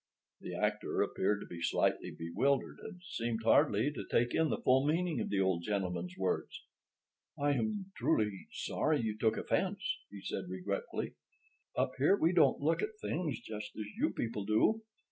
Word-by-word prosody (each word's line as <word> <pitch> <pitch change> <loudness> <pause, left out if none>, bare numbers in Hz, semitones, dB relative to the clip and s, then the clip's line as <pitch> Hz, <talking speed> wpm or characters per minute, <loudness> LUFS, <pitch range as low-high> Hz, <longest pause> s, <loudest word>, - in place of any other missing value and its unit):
The - - -6
actor - - +1
appeared 105 0 0
to - - -6
be 85 -1 -8
slightly - - +1
bewildered, 130 +13 0
and 180 -4 -9
seemed 115 -9 -3
hardly 110 +3 +4
to - - -5
take 120 +1 +2
in 160 -1 +3
the - - 0
full 130 +1 +4
meaning 160 -2 +1
of - - -2
the 100 - +1
old 95 -3 +2
gentleman's 90 -2 -2
words. 95 -1 -2 0.8
"I 145 0 +3
am 205 +4 -1
truly 105 -10 0
sorry 155 -1 0
you 110 -2 -1
took 110 0 +1
offense," 200 +1 -1
he 100 -1 -9
said - - -3
regretfully. 95 +2 -3 0.6
"Up - - +2
here 155 +9 +5
we 165 0 +3
don't 155 -6 +5
look 160 +3 +2
at 425 0 -3
things 160 - -2
just 105 -1 -7
as 110 - -3
you - - +2
people 115 -3 -3
do. 110 - +3
115 Hz, 170 wpm, -33 LUFS, 100-160 Hz, 0.8 s, here